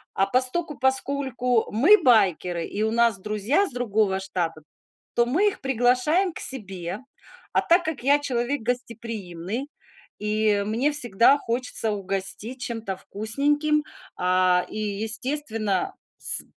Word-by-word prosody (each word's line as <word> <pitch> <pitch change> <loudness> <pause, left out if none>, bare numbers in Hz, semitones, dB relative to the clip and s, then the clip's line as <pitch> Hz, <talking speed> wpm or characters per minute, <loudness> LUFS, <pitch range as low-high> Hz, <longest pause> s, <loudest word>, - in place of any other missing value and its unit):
А 195 - +2
постольку-поскольку 265 -2 0
мы 300 - +5
байкеры 185 -7 +2
и 210 - -4
у 220 - 0
нас 235 -2 +2
друзья 215 - 0
с - - +1
другого 215 -5 0
штата, 175 -4 -4 0.5
то 235 - +3
мы 325 +13 +1
их 395 - -10
приглашаем 265 - +1
к - - -8
себе. 190 -7 +1 0.5
А - - +3
так 345 +2 +3
как 305 -6 -4
я 285 +2 +4
человек 260 0 -2
гостеприимный 230 - -5 0.5
и 210 -1 0
мне 235 +8 0
всегда 245 -2 +4
хочется 235 -3 -1
угостить 195 +5 -3
чем-то 225 -5 -4
вкусненьким, 290 +10 +1 0.3
а, 180 0 +2
и, - - -8
естественно, 215 0 -1 0.2
с - - +5
230 Hz, 125 wpm, -24 LUFS, 200-265 Hz, 0.5 s, мы